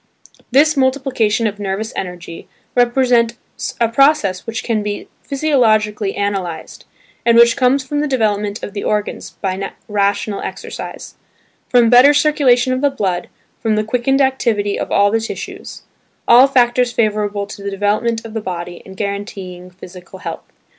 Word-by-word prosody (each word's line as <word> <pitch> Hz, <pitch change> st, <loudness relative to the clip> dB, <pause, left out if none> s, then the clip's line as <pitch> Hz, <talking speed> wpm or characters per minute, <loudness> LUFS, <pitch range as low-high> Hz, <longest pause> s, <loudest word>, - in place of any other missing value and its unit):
This 300 Hz, +5 st, +4 dB
"multiplication 260 Hz, -5 st, +1 dB
of 210 Hz, -1 st, -2 dB
nervous 205 Hz, +2 st, -3 dB
energy" 175 Hz, -2 st, -7 dB, 0.3 s
represents 240 Hz, -1 st, 0 dB
a 230 Hz, -, +3 dB
process 230 Hz, -7 st, +2 dB
which 230 Hz, +2 st, -4 dB
can 225 Hz, -3 st, 0 dB
be 205 Hz, 0 st, -4 dB
physiologically 220 Hz, -8 st, +1 dB
analysed, 190 Hz, -5 st, -4 dB, 0.4 s
and 235 Hz, 0 st, +4 dB
which 235 Hz, 0 st, +6 dB
comes 265 Hz, +1 st, +2 dB
from 290 Hz, +2 st, -2 dB
the 300 Hz, -, 0 dB
development 210 Hz, -5 st, -1 dB
of 200 Hz, -, -6 dB
the 200 Hz, -, -4 dB
organs 210 Hz, -1 st, -3 dB
by 195 Hz, 0 st, -3 dB
rational 200 Hz, 0 st, 0 dB
exercise, -, -, -7 dB, 0.6 s
from 240 Hz, -2 st, +4 dB
better 260 Hz, +4 st, +7 dB
circulation 270 Hz, -4 st, +3 dB
of 255 Hz, -, -2 dB
the 285 Hz, -, +3 dB
blood, 195 Hz, -9 st, -2 dB, 0.3 s
from 220 Hz, -2 st, 0 dB
the 215 Hz, -, +1 dB
quickened 250 Hz, +5 st, +1 dB
activity 230 Hz, -6 st, 0 dB
of -, -, -4 dB
all 200 Hz, 0 st, +3 dB
the 225 Hz, -, +2 dB
tissues–all 235 Hz, +2 st, 0 dB
factors 245 Hz, -2 st, +2 dB
favourable 210 Hz, -3 st, 0 dB
to 200 Hz, -, -10 dB
the 200 Hz, -, -4 dB
development 215 Hz, +3 st, -1 dB
of 225 Hz, -, -9 dB
the 225 Hz, -, -3 dB
body 175 Hz, -2 st, -6 dB
and 190 Hz, 0 st, -13 dB
guaranteeing 195 Hz, -3 st, -5 dB
physical 180 Hz, 0 st, -12 dB
health. -, -, -8 dB
220 Hz, 145 wpm, -17 LUFS, 200-250 Hz, 0.6 s, better